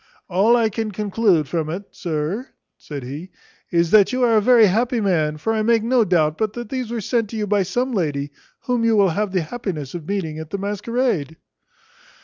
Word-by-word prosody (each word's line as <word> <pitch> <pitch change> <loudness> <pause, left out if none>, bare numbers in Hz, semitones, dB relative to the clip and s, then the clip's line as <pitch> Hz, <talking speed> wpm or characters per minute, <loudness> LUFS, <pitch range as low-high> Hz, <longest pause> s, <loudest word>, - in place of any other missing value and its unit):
"All 200 +6 +3
I 225 -2 +2
can 220 +1 -3
conclude 200 -5 +1
from 160 -1 -2
it, 180 +5 -4
sir," 170 - -3 0.3
said 145 -3 -8
he, 145 +9 -7 0.4
"is, 170 -2 +1
that 210 -1 +6
you 255 0 0
are 230 -2 +4
a 215 - +5
very 235 0 +6
happy 230 +5 +1
man; 160 -7 +1
for 225 +9 -1
I 220 - 0
make 225 0 +2
no 240 0 +3
doubt 160 -5 +1
but 215 -1 -1
these 255 -3 -3
were 235 -1 -3
sent 230 +1 -1
you 215 -2 -1
by 205 0 +2
some 245 +8 -1
lady 145 -7 -1 0.3
whom 245 -2 -1
you 230 -1 +3
will 200 -2 +4
have 205 +4 -1
the 185 -2 +1
happiness 160 - -5
of 165 -3 -7
meeting 165 -6 -3
at 160 -1 -8
the 200 - -3
masquerade." 200 - -2
200 Hz, 200 wpm, -21 LUFS, 160-230 Hz, 0.4 s, that